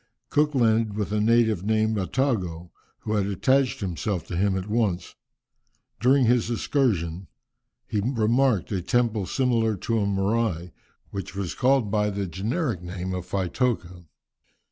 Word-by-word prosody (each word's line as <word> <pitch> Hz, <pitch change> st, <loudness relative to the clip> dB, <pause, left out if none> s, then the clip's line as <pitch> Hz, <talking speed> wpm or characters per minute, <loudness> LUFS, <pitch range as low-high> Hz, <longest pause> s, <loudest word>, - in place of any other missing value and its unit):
Cook 150 Hz, 0 st, +2 dB
landed 115 Hz, -3 st, +2 dB
with 105 Hz, -1 st, -2 dB
a 105 Hz, -, +1 dB
native 110 Hz, -4 st, +3 dB
named 110 Hz, +1 st, +1 dB
Attago, 95 Hz, -6 st, -1 dB, 0.3 s
who 110 Hz, -, -3 dB
had 100 Hz, -2 st, +1 dB
attached 130 Hz, +7 st, +1 dB
himself 95 Hz, 0 st, -2 dB
to 90 Hz, -, -3 dB
him 95 Hz, +2 st, +1 dB
at 95 Hz, -, -4 dB
once. 105 Hz, -5 st, -1 dB, 0.9 s
During 130 Hz, +3 st, +4 dB
his 120 Hz, -1 st, +2 dB
excursion, 95 Hz, -, 0 dB, 0.6 s
he 110 Hz, -4 st, -2 dB
remarked 115 Hz, -2 st, +1 dB
a 95 Hz, -3 st, -1 dB
temple 110 Hz, 0 st, 0 dB
similar 115 Hz, -4 st, +1 dB
to 115 Hz, +4 st, -1 dB
a 100 Hz, -, 0 dB
"morai," 100 Hz, 0 st, +1 dB
and 90 Hz, +1 st, -11 dB, 0.4 s
which 95 Hz, 0 st, -6 dB
was 95 Hz, -3 st, -3 dB
called 130 Hz, -5 st, +2 dB
by 105 Hz, -1 st, +1 dB
the 100 Hz, -1 st, -2 dB
generic 105 Hz, -, -2 dB
name 90 Hz, +1 st, -5 dB
of 90 Hz, -1 st, -5 dB
Faitoka. 90 Hz, -2 st, -2 dB
105 Hz, 145 wpm, -25 LUFS, 95-120 Hz, 0.9 s, During